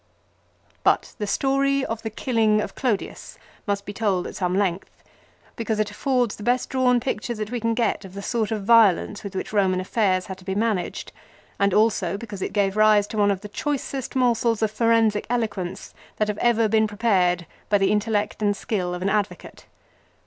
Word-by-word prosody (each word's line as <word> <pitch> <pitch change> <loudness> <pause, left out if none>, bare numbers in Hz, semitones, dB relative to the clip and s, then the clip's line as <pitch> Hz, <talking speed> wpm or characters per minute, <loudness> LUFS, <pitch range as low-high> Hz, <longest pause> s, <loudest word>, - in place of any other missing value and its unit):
But - - +2
the 210 - -2
story 275 +4 +1
of 225 0 -4
the 220 - -4
killing 220 -2 +1
of - - -3
Clodius 230 -7 -3 0.3
must 200 0 -1
be 205 - -6
told 200 -4 0
at - - -7
some 180 0 -1
length, 190 -2 -1 0.7
because 220 -2 -2
it 215 - 0
affords 250 -5 0
the - - -13
best 245 +3 0
drawn 250 -2 +3
picture 240 -1 -3
that 215 0 -5
we 245 - -2
can 230 0 0
get 230 -3 0
of 190 0 -11
the 200 - -6
sort 225 -2 -1
of 215 -3 -3
violence 210 -3 +4
with 200 -1 -7
which - - -4
Eoman 190 -3 +2
affairs 185 -1 0
had 190 -1 -8
to - - -15
be 190 +1 -3
managed; 210 -4 -1 0.5
and 200 0 +3
also 200 -3 +2
because 210 -3 -8
it - - -2
gave 200 -1 +1
rise 215 -1 +5
to 215 - -5
one 205 0 +4
of 195 -2 -1
the 210 - -7
choicest 270 +3 -4
morsels 235 -3 +2
of 215 - +1
forensic 225 -2 +2
eloquence 200 -6 -3 0.2
that 215 0 0
have 210 - -3
ever 230 -2 +3
been 220 0 +3
prepared 190 -5 +1 0.2
by 205 - +4
the 195 -1 +2
intellect 210 0 0
and 205 -1 +1
skill 180 -4 -2
of 180 - -5
an 195 - +1
advocate. 205 0 -3
210 Hz, 195 wpm, -23 LUFS, 200-230 Hz, 0.7 s, rise